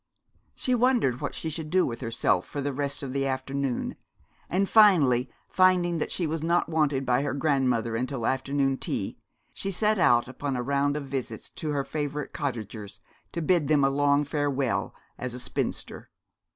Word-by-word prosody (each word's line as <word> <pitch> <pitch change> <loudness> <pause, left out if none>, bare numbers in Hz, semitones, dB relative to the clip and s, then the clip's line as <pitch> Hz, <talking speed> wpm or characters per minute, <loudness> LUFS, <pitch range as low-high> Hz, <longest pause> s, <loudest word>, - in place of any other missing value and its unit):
She 255 - 0
wondered 240 - +2
what - - -3
she 160 - -3
should 155 0 -4
do 185 +2 +3
with 115 +1 -5
herself 115 -2 0
for 145 - -5
the 140 0 -2
rest 140 +1 -2
of 130 -2 -5
the 135 0 0
afternoon, 135 0 -2 0.5
and 195 +2 +1
finally, 150 - +5 0.2
finding 180 -2 +3
that - - -2
she 175 - -1
was 160 0 -2
not 170 +2 +1
wanted 150 -4 +1
by 125 +1 +2
her 140 -1 -2
grandmother 130 -6 +1
until 125 0 -2
afternoon 135 +1 0
tea, - - -3 0.3
she 195 - -2
set 210 +2 +1
out 120 -9 +4
upon 135 +1 -4
a 125 - -2
round 140 +2 +1
of 145 - -5
visits 130 -5 -5
to 155 - -4
her 145 -2 0
favourite 145 -1 -4
cottagers, 110 -7 -5 0.3
to 170 - -3
bid 170 -3 +2
them 150 -2 +3
a 135 - +3
long 145 +1 +3
farewell 140 -4 -1 0.2
as 125 -1 -4
a - - -6
spinster. 125 - -3
140 Hz, 180 wpm, -27 LUFS, 130-160 Hz, 0.5 s, finally